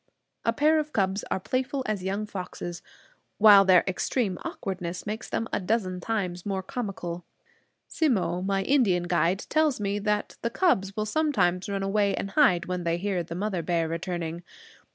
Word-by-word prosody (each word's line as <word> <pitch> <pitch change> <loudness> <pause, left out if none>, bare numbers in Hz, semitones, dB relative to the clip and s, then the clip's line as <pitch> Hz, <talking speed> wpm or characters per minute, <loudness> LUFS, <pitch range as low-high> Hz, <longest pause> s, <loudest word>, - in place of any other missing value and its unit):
A 230 - +2
pair 305 +6 +3
of 305 0 -4
cubs 195 0 0
are - - 0
playful 260 +6 -2
as 210 -3 -2
young 195 +3 -2
foxes, 180 -3 -6 0.6
while 205 -2 +8
their 185 -2 +6
extreme 190 +1 -1
awkwardness 180 -2 -5
makes 215 +2 -5
them 225 - -2
a - - +1
dozen 185 -2 -1
times 180 -5 -2
more 195 -2 -2
comical. 185 -7 -5 0.6
Simmo, 220 - 0
my 195 0 0
Indian 205 -9 +3
guide, 175 +2 +1
tells 310 -5 +2
me 200 0 -1
that 210 0 -1
the 235 - 0
cubs 200 - +1
will 215 - -1
sometimes 210 - +1
run 195 -1 -2
away 200 0 +1
and 195 - -4
hide 190 - +4
when 180 -1 -3
they 170 0 0
hear 190 -1 -1
the 165 0 -7
mother 190 -1 -2
bear 165 0 0
returning. 170 0 -4
195 Hz, 170 wpm, -27 LUFS, 180-220 Hz, 0.6 s, while